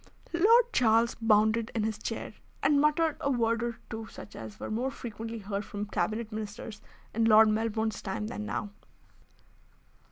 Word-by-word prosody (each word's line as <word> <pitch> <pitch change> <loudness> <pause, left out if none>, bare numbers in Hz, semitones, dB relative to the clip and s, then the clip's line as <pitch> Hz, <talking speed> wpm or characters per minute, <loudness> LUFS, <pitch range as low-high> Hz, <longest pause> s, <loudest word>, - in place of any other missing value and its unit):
Lord 455 +7 +5
Charles 230 -1 +4
bounded 220 0 +3
in 220 - +1
his 220 -1 -2
chair, 225 0 -5 0.3
and 285 0 +4
muttered 305 +1 +2
a 280 - 0
word 230 -3 +1
or 235 -1 -2
two 220 0 -6
such 105 - -11
as 110 -2 -9
were - - -5
more 245 +5 0
frequently 225 -2 -6
heard 200 -1 -4
from 205 -1 -5
Cabinet 220 +2 -2
Ministers 215 0 -6 0.3
in 225 +1 +2
Lord 220 0 +7
Melbourne's 220 0 -1
time 195 +2 -3
than 215 -1 -5
now. 205 -1 -3
225 Hz, 160 wpm, -29 LUFS, 215-235 Hz, 0.3 s, Lord